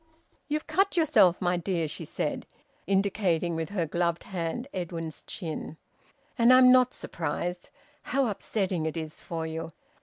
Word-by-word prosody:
"You've 300 Hz, +1 st, -2 dB
cut 390 Hz, -1 st, +1 dB
yourself, 240 Hz, -, +5 dB
my 180 Hz, -1 st, +1 dB
dear," 170 Hz, -2 st, -1 dB
she -, -, -5 dB
said, -, -, -3 dB, 0.4 s
indicating 190 Hz, -3 st, +1 dB
with 160 Hz, 0 st, -3 dB
her 190 Hz, -5 st, -1 dB
gloved 170 Hz, +2 st, -1 dB
hand 185 Hz, +7 st, -4 dB
Edwin's 165 Hz, -3 st, -4 dB
chin. 160 Hz, -3 st, -5 dB, 0.6 s
"And 235 Hz, +1 st, +6 dB
I'm 255 Hz, 0 st, +8 dB
not 255 Hz, 0 st, +5 dB
surprised. 175 Hz, +2 st, -4 dB, 0.3 s
How 275 Hz, 0 st, +1 dB
upsetting 190 Hz, -6 st, -1 dB
it 160 Hz, -, -4 dB
is 155 Hz, -1 st, -6 dB
for 165 Hz, -1 st, -4 dB
you! 160 Hz, 0 st, -4 dB
180 Hz, 145 wpm, -28 LUFS, 165-220 Hz, 0.6 s, I'm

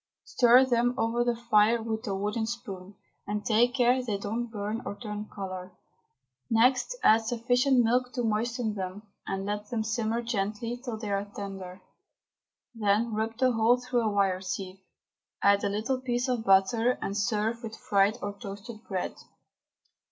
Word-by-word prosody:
Stir 250 Hz, +1 st, +5 dB
them 245 Hz, -1 st, +1 dB
over 230 Hz, +1 st, +1 dB
the 240 Hz, 0 st, +1 dB
fire 230 Hz, -1 st, +3 dB
with 220 Hz, +1 st, -3 dB
a 195 Hz, -, -1 dB
wooden 210 Hz, +3 st, -1 dB
spoon, 200 Hz, -4 st, -7 dB, 0.3 s
and 210 Hz, 0 st, -3 dB
take 240 Hz, +3 st, +3 dB
care 250 Hz, 0 st, +3 dB
they 215 Hz, -5 st, -2 dB
don't 220 Hz, +4 st, -3 dB
burn 215 Hz, +1 st, -4 dB
or -, -, -5 dB
turn 210 Hz, -1 st, -6 dB
colour. 185 Hz, -2 st, -6 dB, 0.8 s
Next 250 Hz, -, +3 dB
add 220 Hz, -, +6 dB
sufficient 245 Hz, +3 st, +2 dB
milk 250 Hz, +2 st, +1 dB
to 245 Hz, -, -2 dB
moisten 225 Hz, +1 st, -1 dB
them, 190 Hz, +1 st, -5 dB, 0.2 s
and 195 Hz, 0 st, -3 dB
let 210 Hz, +1 st, -4 dB
them 225 Hz, -2 st, -1 dB
simmer 225 Hz, +1 st, -1 dB
gently 230 Hz, +2 st, -3 dB
till 240 Hz, -4 st, -4 dB
they 215 Hz, -2 st, -5 dB
are 200 Hz, 0 st, 0 dB
tender; 195 Hz, -2 st, -8 dB, 0.9 s
then 220 Hz, +1 st, +1 dB
rub 220 Hz, +1 st, -2 dB
the 255 Hz, 0 st, +3 dB
whole 230 Hz, +1 st, +4 dB
through 250 Hz, -1 st, 0 dB
a 220 Hz, -, +1 dB
wire 195 Hz, -2 st, +1 dB
sieve, 190 Hz, 0 st, -5 dB, 0.6 s
add 200 Hz, 0 st, +4 dB
a 200 Hz, -, +1 dB
little 225 Hz, +6 st, -1 dB
piece 245 Hz, 0 st, -1 dB
of 245 Hz, -3 st, -1 dB
butter, 225 Hz, +5 st, +3 dB
and 195 Hz, -, -3 dB
serve 215 Hz, +2 st, 0 dB
with 220 Hz, -2 st, -7 dB
fried 200 Hz, +2 st, +2 dB
or 205 Hz, 0 st, -3 dB
toasted 205 Hz, +3 st, -9 dB
bread. 190 Hz, -2 st, -2 dB
220 Hz, 165 wpm, -28 LUFS, 200-240 Hz, 0.9 s, add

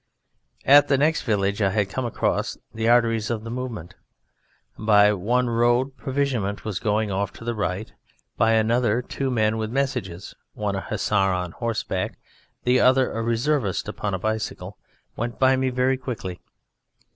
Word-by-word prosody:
At 145 Hz, +1 st, +7 dB
the 140 Hz, -, +3 dB
next 155 Hz, +4 st, +2 dB
village 100 Hz, -2 st, 0 dB
I 100 Hz, -, +3 dB
had 105 Hz, 0 st, 0 dB
come 130 Hz, -, -2 dB
across 120 Hz, -, -1 dB, 0.2 s
the 110 Hz, +1 st, 0 dB
arteries 115 Hz, -2 st, +3 dB
of 115 Hz, -2 st, -2 dB
the 115 Hz, -, -6 dB
movement. 115 Hz, -8 st, -5 dB, 0.8 s
By 105 Hz, -1 st, +4 dB
one 120 Hz, +6 st, 0 dB
road 120 Hz, +3 st, +2 dB
provisionment 130 Hz, -9 st, -2 dB
was 105 Hz, -4 st, -3 dB
going 105 Hz, -1 st, 0 dB
off 100 Hz, +1 st, -1 dB
to -, -, -12 dB
the 120 Hz, -, -1 dB
right; 105 Hz, -1 st, -3 dB, 0.4 s
by 115 Hz, -, +3 dB
another 115 Hz, +1 st, +2 dB
two 135 Hz, +2 st, -3 dB
men 110 Hz, -3 st, +1 dB
with 110 Hz, -1 st, -2 dB
messages, 125 Hz, -8 st, -3 dB, 0.2 s
one 105 Hz, -2 st, -2 dB
a 95 Hz, -, -2 dB
Hussar -, -, -3 dB, 0.2 s
on 90 Hz, -1 st, -3 dB
horseback, 110 Hz, -4 st, -3 dB, 0.5 s
the 125 Hz, +1 st, +3 dB
other 130 Hz, 0 st, +4 dB
a 115 Hz, -, -3 dB
Reservist 115 Hz, -2 st, 0 dB
upon 100 Hz, -2 st, -3 dB
a -, -, -1 dB
bicycle, 105 Hz, -2 st, -3 dB, 0.4 s
went 120 Hz, 0 st, -4 dB
by 130 Hz, 0 st, +4 dB
me 130 Hz, 0 st, 0 dB
very 130 Hz, +1 st, +1 dB
quickly. 115 Hz, -9 st, -6 dB
115 Hz, 160 wpm, -24 LUFS, 105-125 Hz, 0.8 s, At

